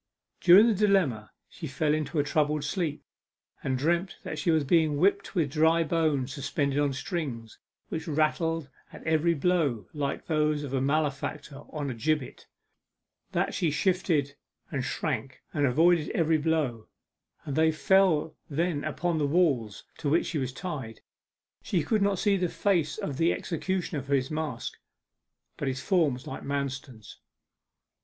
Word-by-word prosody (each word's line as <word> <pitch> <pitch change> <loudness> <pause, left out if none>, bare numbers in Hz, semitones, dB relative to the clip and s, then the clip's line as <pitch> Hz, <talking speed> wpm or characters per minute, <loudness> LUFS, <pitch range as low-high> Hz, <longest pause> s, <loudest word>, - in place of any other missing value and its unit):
During 185 +5 +8
the 235 - +4
dilemma 185 - +2 0.2
she 160 - -8
fell 150 +3 0
into 155 +1 -2
a 145 - +3
troubled 150 0 +1
sleep, 150 0 -2 0.6
and 130 -1 0
dreamt 170 +6 0
that 155 - -5
she 150 - 0
was 160 -2 +3
being 155 0 +3
whipped 200 +5 +1
with 155 -6 +1
dry 160 +2 +3
bones 155 -5 0
suspended 140 0 -1
on 145 -1 +2
strings, 130 -6 -5 0.3
which 160 0 -4
rattled 160 0 0 0.2
at - - -11
every 160 +1 +2
blow 145 - +1
like 140 -2 -3
those 150 -2 +1
of 140 -2 -6
a 135 - +1
malefactor 140 0 -1
on 145 -3 -3
a - - -3
gibbet; 150 +3 -2 0.9
that - - 0
she 170 - +1
shifted 155 -3 +1 0.4
and 135 -2 -2
shrank 135 -3 -3
and 145 -2 +2
avoided 160 +4 +3
every 160 -1 +3
blow, 145 -8 -1 0.6
and 140 - -3
they 160 0 +4
fell 160 -2 +3
then 160 0 -1
upon 160 +2 -1
the 145 - +1
wall 140 -9 +2 0.3
to 150 - -1
which 165 +4 +3
she 160 - -2
was 130 -1 -2
tied. 130 - -6 0.6
She 175 -5 0
could 215 +7 +1
not 200 -1 +2
see 200 +1 +2
the 180 -2 0
face 175 -7 0
of 140 - -4
the 165 +2 +3
executioner 175 -2 -2
for 140 +2 0
his 130 +1 -1
mask, 155 -6 -4 0.8
but - - -3
his 130 0 -1
form 160 -6 +2
was 125 - -11
like - - -6
Manston's. 135 -5 -5
155 Hz, 160 wpm, -28 LUFS, 140-170 Hz, 0.9 s, During